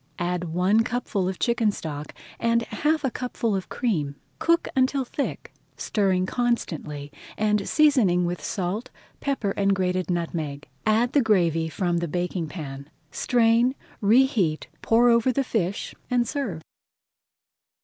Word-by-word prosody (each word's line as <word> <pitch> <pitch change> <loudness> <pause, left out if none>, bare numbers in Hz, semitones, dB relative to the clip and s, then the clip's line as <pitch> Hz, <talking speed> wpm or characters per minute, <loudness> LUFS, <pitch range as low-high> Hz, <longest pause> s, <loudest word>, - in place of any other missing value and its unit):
Add 180 0 -1
one 180 +6 +2
cupful 225 -6 -1
of 190 - -4
chicken 235 -3 +2
stock 150 -5 -6 0.2
and 235 0 +2
half 305 +5 0
a 265 - 0
cupful 240 -4 -2
of 190 - -4
cream. 155 - -1 0.2
Cook 335 0 +2
until 260 +1 +2
thick, 280 +3 -4 0.2
stirring 190 -3 +1
constantly, 160 - -2 0.3
and 210 -2 +1
seasoning 240 - +4
with 175 0 -3
salt, 200 +7 -3 0.3
pepper, 270 -8 -1
and 195 0 +2
grated 185 -1 -1
nutmeg. 160 -4 -3 0.2
Add 225 +3 +3
the 285 - +5
gravy 170 -8 +2
from 175 0 -1
the 170 0 -1
baking 175 0 -2
pan, 140 -4 -7 0.2
strain, 240 +2 +3 0.3
reheat, 215 - +3
pour 235 +2 +4
over 235 +2 +4
the 275 +2 0
fish, 200 -6 -2 0.2
and 245 -1 +2
serve. 220 - -3
200 Hz, 135 wpm, -25 LUFS, 175-240 Hz, 0.3 s, the